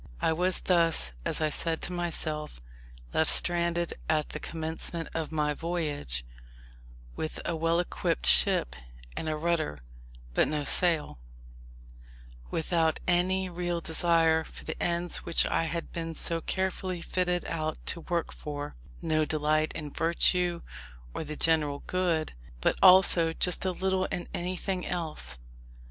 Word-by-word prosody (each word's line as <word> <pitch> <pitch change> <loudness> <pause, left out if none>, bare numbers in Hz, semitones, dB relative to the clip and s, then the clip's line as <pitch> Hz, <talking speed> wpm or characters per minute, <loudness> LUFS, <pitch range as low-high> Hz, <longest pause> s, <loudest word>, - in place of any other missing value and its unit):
I 160 - +2
was 180 +2 +1
thus, 165 - +2
as - - 0
I 155 -1 +1
said 165 +1 +1
to 180 - -3
myself, 155 - -2 0.5
left 160 - +3
stranded 170 -1 +3 0.2
at 155 -1 +1
the 155 - -5
commencement 165 +1 -5
of 160 -1 -3
my 150 -1 0
voyage, 145 - -2 0.9
with 155 - -4
a 170 - -1
well 165 +1 +1
equipped 60 - -1
ship - - +4 0.4
and 160 - -3
a 155 - -1
rudder, 160 - -1 0.6
but - - +3
no 150 -1 -1
sail; 160 - +2 1.3
without 160 -1 0
any 185 +1 +2
real 175 -1 -2
desire 165 -1 +2
for - - -12
the - - -5
ends 175 0 0
which 170 - +2
I 165 - +1
had 165 +1 -4
been 165 -1 -5
so 165 +1 +1
carefully 185 -1 -2
fitted 180 0 -1
out 155 -1 -2
to 170 - 0
work 170 0 -2
for: 145 - -6 0.3
no 155 0 +2
delight 155 0 +1
in 150 -3 -6
virtue, 170 +1 +3 0.5
or - - -4
the 155 0 -6
general 150 -3 +1
good, 175 -4 0 0.3
but - - +2
also 180 -3 +6
just 180 +2 +1
as 185 - -3
little 190 0 +2
in 175 - -4
anything 180 +1 -2
else. 160 - -4
165 Hz, 140 wpm, -29 LUFS, 155-175 Hz, 1.3 s, also